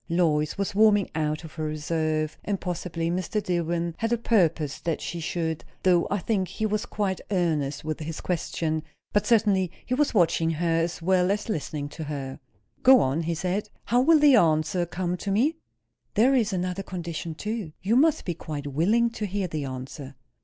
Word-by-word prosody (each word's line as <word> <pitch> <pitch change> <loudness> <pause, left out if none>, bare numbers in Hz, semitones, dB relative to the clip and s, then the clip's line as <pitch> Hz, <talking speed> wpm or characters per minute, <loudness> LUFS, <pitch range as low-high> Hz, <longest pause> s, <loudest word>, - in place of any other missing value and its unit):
Lois 155 -3 +1
was 200 0 -1
warming 205 -1 +4
out 155 0 -1
of 160 -1 -10
her 155 - -4
reserve, 155 0 -1
and 200 -2 -2
possibly 170 -2 -3
Mr. 185 +4 -1
Dillwyn 170 -2 -1
had 225 0 -1
a 235 - +3
purpose 170 -10 +1
that 165 -2 -2
she 170 - -5
should; 160 -1 -2 0.2
though 180 -2 +4
I 205 - +1
think 190 0 0
he 220 - -3
was 215 0 -1
quite 195 -3 -2
earnest 155 -7 0
with 155 0 -3
his 160 0 -5
question. 160 -2 -2 0.3
But 205 - +2
certainly 205 -6 +3
he 250 - -2
was 285 -1 +1
watching 165 -3 +3
her, 165 +1 +1
as 165 0 -3
well 185 0 +3
as 210 +3 -1
listening 150 -5 -3
to 155 +1 -7
her. 140 -2 -5 0.4
"Go 260 0 +8
on," 135 +5 +1
he 165 +1 -1
said. 185 +5 -2 0.2
"How 245 +1 +3
will 320 +4 +6
the 295 -3 +6
answer 165 0 +2
come 180 +1 -2
to 200 - -5
me?" 260 +11 +2 0.6
"There 250 +6 +5
is 230 -5 +2
another 180 0 -2
condition, 170 -3 -5
too. 210 -4 -4
You 210 +5 +2
must 305 +4 +3
be 175 - -1
quite 150 -3 -6
willing 200 - +2
to 215 -2 -4
hear 195 0 -2
the 155 -4 -3
answer." 135 +2 -7
175 Hz, 190 wpm, -26 LUFS, 155-205 Hz, 0.6 s, Go